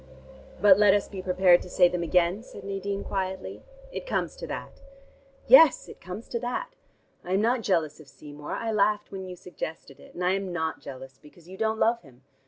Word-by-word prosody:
"But 195 0 +6
let 205 -1 +6
us 205 - -1
be 195 -2 -7
prepared 180 -1 +4
to - - -10
say 180 0 +5
them 175 0 -3
again?" 175 +3 +1
said 245 - -12
Nadine 200 0 -4
quietly. 190 -1 -4 0.3
"It - - -7
comes - - -2
to - - -7
that." - - -7 0.6
"Yes, 325 - +7
it - - -13
comes 185 +5 -8
to 235 - -2
that. 255 - -4 0.5
I 180 - -4
am 195 - +2
not 240 +2 +1
jealous 165 -8 0
of 155 - -14
Seymour. 145 0 -9
I 225 -1 -2
laughed 210 0 +1
when 190 -1 -6
you 180 - -7
suggested 160 -5 -8
it; - - -17
and 180 - -3
I 180 - +3
am 195 -1 -2
not 160 -2 -3
jealous, 130 0 -10
because 160 +3 -18
you 185 - -10
don't 220 +2 -1
love 230 +2 +2
him. 130 -4 -20
190 Hz, 205 wpm, -27 LUFS, 175-210 Hz, 0.6 s, Yes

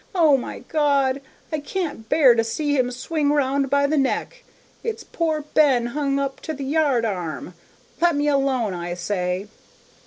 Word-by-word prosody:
O 320 -5 +5
my 255 - -4
God, 280 -3 +2 0.3
I 310 - -1
can't 295 - -4
bear 270 -6 +6
to 230 -1 +2
see 290 +6 -1
him 255 -2 +2
swing 285 +4 -1
round 275 -1 +1
by 280 +1 +3
the 295 +1 +2
neck! - - -2 0.4
It's 455 -2 -3
poor 315 -2 -1
Ben 265 -6 +4
hung 280 -1 0
up 275 -1 -2
to 315 - -4
the 275 0 -5
yard 280 -5 +2
arm. 180 -4 -4 0.5
Let 345 -2 +4
me 290 +1 0
alone, 270 -7 +1
I 175 0 -4
say!' 180 +1 -2
275 Hz, 165 wpm, -23 LUFS, 240-300 Hz, 0.5 s, bear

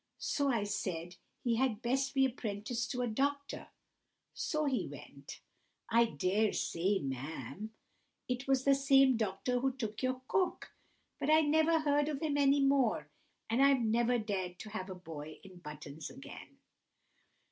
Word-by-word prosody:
So 285 -2 0
I 230 -5 +1
said 180 -4 -3 0.3
he 235 -2 +1
had 240 -3 0
best 270 +3 0
be 270 0 +5
apprenticed 230 -1 -3
to 250 0 -1
a - - 0
doctor; 280 +5 -2 0.7
so 305 -1 -1
he 265 -3 0
went—I 235 +1 -3
dare 200 +4 +1
say, 190 +4 0
ma'am, 140 - -5 0.6
it 250 +2 -3
was 265 -1 +2
the 275 - +5
same 270 -1 +5
doctor 220 +3 -1
who 265 +2 +1
took 220 -5 -5
your 255 0 -1
cook—but 370 -4 -3
I 310 +1 +7
never 315 +2 +3
heard 290 0 +2
of 290 -3 -2
him 300 -2 0
any 280 0 +4
more, 260 - +2 0.4
and 230 +4 +1
I've 275 -2 +5
never 235 +2 +2
dared 190 -5 -3
to 215 - -8
have 190 -2 -5
a 185 - -5
boy 155 -3 -8
in 190 -2 -13
buttons 150 -1 -8
again." 270 +2 -11
240 Hz, 150 wpm, -33 LUFS, 195-275 Hz, 0.7 s, I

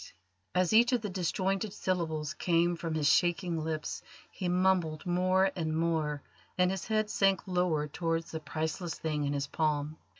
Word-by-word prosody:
As 180 +2 +2
each 240 +3 +6
of 245 - +2
the 210 -3 -4
disjointed 190 +2 -1
syllables 160 -4 -2
came 175 -1 +2
from 165 -1 -4
his 150 -2 +1
shaking 175 0 +2
lips 155 -1 -3 0.3
he 180 - -3
mumbled 180 -4 +1
more 185 +2 +2
and 160 -3 -1
more, 160 -3 0 0.3
and 180 0 +3
his 190 -2 -4
head 215 -1 +1
sank 195 -2 +2
lower 180 -5 +1
towards 165 +2 -2
the 160 - -4
priceless 160 +3 -3
thing 150 -2 -2
in 140 - -1
his 140 0 -1
palm. 150 0 -1
170 Hz, 165 wpm, -31 LUFS, 155-185 Hz, 0.3 s, each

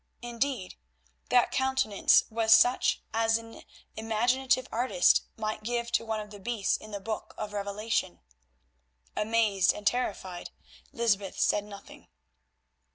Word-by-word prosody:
Indeed, 240 -4 -3 0.5
that 245 -1 +3
countenance 265 -6 +3
was 225 0 +4
such 245 +1 +2
as 225 0 +2
an 225 0 -11 0.3
imaginative 245 +4 +1
artist 230 -6 +3 0.2
might 215 -1 -3
give 235 +1 -2
to - - +1
one 220 -1 -3
of 210 -1 -8
the 205 - -10
beasts 210 -1 -1
in 215 - -9
the 205 -1 -5
Book 215 +2 -6
of 210 -1 -5
Revelation. 200 - -2 1.0
Amazed 210 -3 +2
and 210 - -10
terrified, 200 -6 -2 0.4
Lysbeth 205 -5 -1
said 205 - +2
nothing. 200 -1 -13
220 Hz, 125 wpm, -28 LUFS, 205-235 Hz, 1.0 s, was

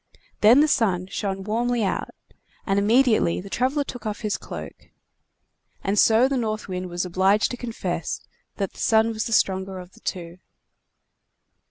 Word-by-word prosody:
Then 235 +7 +7
the 305 - +4
Sun 190 -10 +1
shined 195 -2 -3
out - - -9
warmly, 235 +1 0
and 195 - -1 0.6
immediately 215 0 +3
the 195 +2 -9
traveler 265 +4 +1
took 245 -3 -8
off 210 0 -4
his 210 -3 -1
cloak. - - -9 0.9
And 200 +1 +1
so 225 +3 +5
the 270 0 -1
North 215 -3 -2
Wind 185 -1 -4
was 175 +1 -2
obliged 190 +4 +2
to 245 - -5
confess 190 -9 -4 0.4
that 195 -2 -3
the - - -15
Sun 220 0 +3
was 220 -1 -3
the - - -4
stronger 190 -2 +1
of 180 0 -10
the - - -19
two. 175 -1 -5
210 Hz, 165 wpm, -24 LUFS, 190-230 Hz, 0.9 s, Then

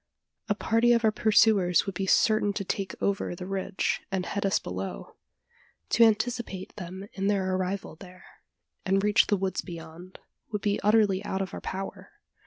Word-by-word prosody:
A 205 - +2
party 230 +3 +3
of 235 -1 +2
our 220 - +5
pursuers 210 -4 +4
would 195 - -4
be 190 +1 -3
certain 215 0 +3
to 200 - -3
take 195 0 -3
over 200 -3 -1
the 180 - -7
ridge, 195 0 -2
and 190 -2 -1
head 200 -1 -1
us 195 - +2
below. 90 -9 -6 0.7
To 235 - +5
anticipate 225 -3 0
them 190 0 -7
in 195 0 -2
their 190 -2 +1
arrival 185 -3 -3
there, 185 0 -14 0.6
and 195 0 +1
reach 210 0 +4
the 205 - +2
woods 190 0 -2
beyond, 170 +1 -10 0.3
would 210 -2 -3
be 205 -1 0
utterly 210 -2 +3
out 195 -2 -2
of 190 - -8
our - - -6
power. 195 +1 -6
195 Hz, 175 wpm, -27 LUFS, 185-210 Hz, 0.7 s, our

